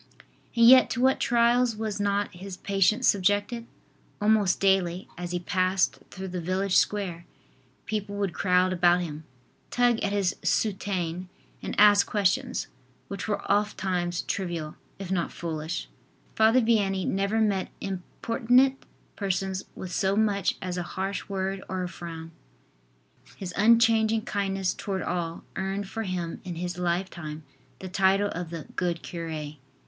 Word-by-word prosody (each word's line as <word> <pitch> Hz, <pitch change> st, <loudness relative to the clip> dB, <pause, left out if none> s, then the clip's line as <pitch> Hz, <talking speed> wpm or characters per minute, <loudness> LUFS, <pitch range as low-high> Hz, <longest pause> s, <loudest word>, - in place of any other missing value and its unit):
And 235 Hz, 0 st, +5 dB
yet 255 Hz, +2 st, +8 dB
to 235 Hz, -, -2 dB
what 265 Hz, +1 st, +4 dB
trials 240 Hz, 0 st, +3 dB
was 215 Hz, -2 st, -3 dB
not 205 Hz, 0 st, 0 dB
his 185 Hz, +1 st, -8 dB
patience 200 Hz, +6 st, +2 dB
subjected? 205 Hz, +4 st, +1 dB, 0.5 s
Almost 210 Hz, -3 st, +3 dB
daily, 190 Hz, -2 st, +2 dB
as 175 Hz, 0 st, -5 dB
he 175 Hz, -, -1 dB
passed 185 Hz, +1 st, +1 dB
through 190 Hz, 0 st, -7 dB
the 180 Hz, -1 st, -4 dB
village 185 Hz, +2 st, 0 dB
square, 180 Hz, -5 st, +1 dB, 0.6 s
people 205 Hz, -2 st, -3 dB
would 200 Hz, -4 st, -1 dB
crowd 185 Hz, 0 st, +2 dB
about 175 Hz, 0 st, +4 dB
him, 155 Hz, -2 st, -6 dB, 0.4 s
tug 245 Hz, -2 st, +2 dB
at 200 Hz, -, -1 dB
his 200 Hz, -2 st, +1 dB
soutane 185 Hz, -4 st, -1 dB, 0.3 s
and -, -, -4 dB
ask 205 Hz, -1 st, +7 dB
questions, 215 Hz, +6 st, 0 dB, 0.4 s
which 200 Hz, +1 st, -5 dB
were 210 Hz, -, -1 dB
oftimes 185 Hz, -4 st, 0 dB
trivial, 170 Hz, -5 st, -3 dB, 0.2 s
if 195 Hz, -2 st, -6 dB
not 175 Hz, -3 st, 0 dB
foolish. 160 Hz, 0 st, -4 dB, 0.5 s
Father 225 Hz, +3 st, +5 dB
Vianney 200 Hz, -5 st, +1 dB
never 200 Hz, +3 st, 0 dB
met 200 Hz, -4 st, +1 dB
importunate 235 Hz, +7 st, +1 dB, 0.3 s
persons 190 Hz, -1 st, -2 dB
with 185 Hz, -, -7 dB
so 190 Hz, +1 st, +1 dB
much 205 Hz, -3 st, +1 dB
as 180 Hz, -1 st, -3 dB
a 175 Hz, -, -6 dB
harsh 195 Hz, +2 st, -3 dB
word 195 Hz, 0 st, -2 dB
or 185 Hz, -1 st, -2 dB
a -, -, -2 dB
frown. 165 Hz, -2 st, -8 dB, 1.1 s
His 185 Hz, -2 st, -6 dB
unchanging 225 Hz, 0 st, +4 dB
kindness 195 Hz, -3 st, -1 dB
toward 195 Hz, -2 st, -3 dB
all 170 Hz, -2 st, -3 dB
earned 195 Hz, +1 st, -2 dB
for 225 Hz, -, -4 dB
him 180 Hz, -5 st, -4 dB
in 180 Hz, -3 st, -5 dB
his 175 Hz, +1 st, -4 dB
life 180 Hz, +2 st, 0 dB
time 155 Hz, -2 st, -7 dB, 0.3 s
the 190 Hz, -, -8 dB
title 195 Hz, +2 st, +2 dB
of 175 Hz, -2 st, -5 dB
the 165 Hz, -2 st, -6 dB
"Good 175 Hz, -2 st, -1 dB
Cure." 160 Hz, -3 st, -5 dB
195 Hz, 145 wpm, -27 LUFS, 180-205 Hz, 1.1 s, yet